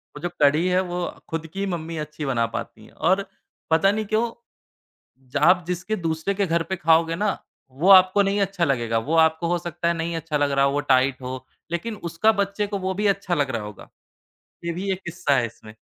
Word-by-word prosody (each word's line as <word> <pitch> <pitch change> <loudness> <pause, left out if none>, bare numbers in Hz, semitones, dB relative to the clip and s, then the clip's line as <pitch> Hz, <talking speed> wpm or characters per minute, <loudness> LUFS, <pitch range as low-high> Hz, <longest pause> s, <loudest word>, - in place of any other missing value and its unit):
वो - - -7
जो 175 - -2
कढ़ी 150 +5 +4
है, 180 0 +3
वो 180 -1 -3 0.3
ख़ुद 165 0 -3
की 195 +1 -2
मम्मी 165 -3 -4
अच्छी 150 0 -5
बना 120 -4 +1
पाती 115 -2 -6
हैं - - -18
और 190 +4 +1 0.4
पता 165 +5 +4
नहीं 215 +1 -2
क्यों 225 +3 0 1.0
जहाँ 145 +2 +2
आप 180 -1 +4
जिसके 180 +5 -2
दूसरे 165 +2 -2
के 200 0 +1
घर 170 -1 0
पे 190 - 0
ख़ाओगे 165 -1 +3
ना, 205 +2 0 0.3
वो 150 +9 0
आपको 185 +1 +7
नहीं 200 +1 +1
अच्छा 195 -3 0
लगेगा, 120 -4 0
वो 145 +9 -1
आपको 160 +1 +3
हो 175 +1 +1
सकता 170 0 -4
है 170 - +3
नहीं 165 0 -3
अच्छा 160 -2 -2
लग 145 -1 +1
रहा 140 0 +3
हो, 140 - +2
वो 145 - 0
टाइट 130 0 +3
हो, 130 0 -6 0.3
लेक़िन 210 +6 -3
उसका 215 +7 +3
बच्चे 200 0 -1
को 205 - -3
वो 190 0 -2
भी 205 +2 0
अच्छा 195 -2 0
लग 145 -4 0
रहा 115 - -2
होगा। 105 0 -10 0.8
ये 170 - -1
भी 190 +3 -3
एक 185 - -4
किस्सा 170 -5 0
है 120 -2 +1
इसमें। 110 -1 -13
170 Hz, 225 wpm, -23 LUFS, 145-190 Hz, 1.0 s, आपको